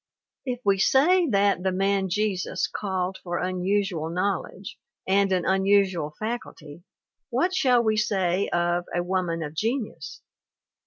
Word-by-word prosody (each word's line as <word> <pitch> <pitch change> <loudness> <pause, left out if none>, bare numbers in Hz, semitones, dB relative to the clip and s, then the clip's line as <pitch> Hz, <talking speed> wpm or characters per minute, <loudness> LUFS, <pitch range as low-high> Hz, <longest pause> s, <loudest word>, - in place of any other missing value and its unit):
If 250 -1 -3
we 195 -1 +3
say 335 - +4
that 200 -3 +2
The 190 0 0
Man 195 +1 0
Jesus 200 -1 -1
called 190 -2 -3
for 175 -1 -4
unusual 185 -2 -1
knowledge 190 +1 -3 0.3
and 195 +1 +2
an 180 -2 +1
unusual 190 -5 +2
faculty, 180 -9 -6 0.5
what 365 +1 0
shall 250 -8 +3
we 215 -1 +1
say 195 -3 0
of 175 0 0
A 175 - 0
Woman 175 -2 -1
of 150 -1 -6
Genius? 225 - -3
190 Hz, 135 wpm, -25 LUFS, 180-210 Hz, 0.5 s, say